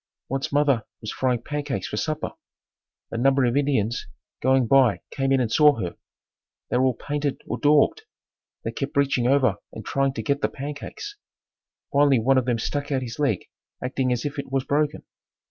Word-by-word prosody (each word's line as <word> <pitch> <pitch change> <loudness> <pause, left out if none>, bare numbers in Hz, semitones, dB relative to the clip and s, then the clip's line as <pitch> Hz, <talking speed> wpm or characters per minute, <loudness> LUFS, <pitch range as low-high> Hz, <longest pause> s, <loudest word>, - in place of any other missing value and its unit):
Once 135 +1 -2
mother 140 -5 +3 0.2
was 110 - -5
frying 125 -2 0
pancakes 145 -9 -3
for - - -5
supper. 155 +7 -2 0.8
A 115 - -3
number 135 +1 +4
of 120 +1 +1
Indians 130 -6 +1 0.3
going 130 0 +3
by 130 -3 +4
came 135 -1 0
in 135 - +4
and 120 -3 0
saw 150 -2 +6
her. 90 -2 -3 0.8
They - - +2
were 130 - +3
all 130 -2 +2
painted 145 0 -2
or - - -4
daubed. 150 0 +4 0.6
They 115 - -2
kept 135 +4 -4
reaching 135 -3 +2
over 130 -6 +3
and 110 - -9
trying 135 -1 +1
to 110 - -4
get 140 +5 0
the - - +1
pancakes. 145 - -7 0.8
Finally 140 -1 +5
one 130 +4 +4
of 125 - -3
them 120 -2 +1
stuck 145 +5 -3
out 130 -2 0
his 120 +2 -7
leg 135 -10 +1 0.4
acting 130 0 0
as 120 +1 -1
if 145 0 -3
it 140 - -6
was 135 -1 +1
broken. 150 +1 0
135 Hz, 185 wpm, -24 LUFS, 120-145 Hz, 0.8 s, saw